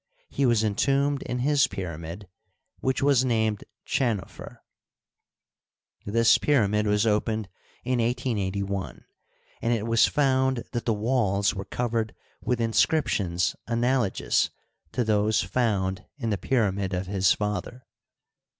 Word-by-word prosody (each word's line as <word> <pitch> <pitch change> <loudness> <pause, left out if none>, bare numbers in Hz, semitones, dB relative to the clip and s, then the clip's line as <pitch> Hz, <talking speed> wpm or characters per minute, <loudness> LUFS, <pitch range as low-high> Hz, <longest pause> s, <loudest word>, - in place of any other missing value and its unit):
He 140 - +1
was 115 -2 +3
entombed 135 +6 +1
in 125 - -3
his 145 -1 +4
pyramid, 85 +1 -6 0.5
which 130 +1 -1
was 140 -3 +4
named 110 -4 0 0.2
Chdnofer. 115 -8 -2 1.5
This 115 +2 +4
pyramid 105 -7 +2
was 105 +1 +2
opened 110 -1 0 0.3
in 125 0 0
1881, 100 -5 -2 0.6
and 115 - 0
it 110 -2 -1
was 115 0 +4
found 130 -3 +1
that 120 -1 -3
the 115 - +2
walls 105 -3 +1
were 95 0 -6
covered 115 0 -2 0.3
with 125 -1 0
inscriptions 105 - +1
analogous 120 -2 +1 0.4
to 125 - +1
those 110 -1 +2
found 95 -3 -1
in 115 -5 -2
the 100 - 0
pyramid 100 -6 0
of 90 +1 -2
his 95 0 +2
father. 105 +4 -4
110 Hz, 120 wpm, -26 LUFS, 100-125 Hz, 1.5 s, his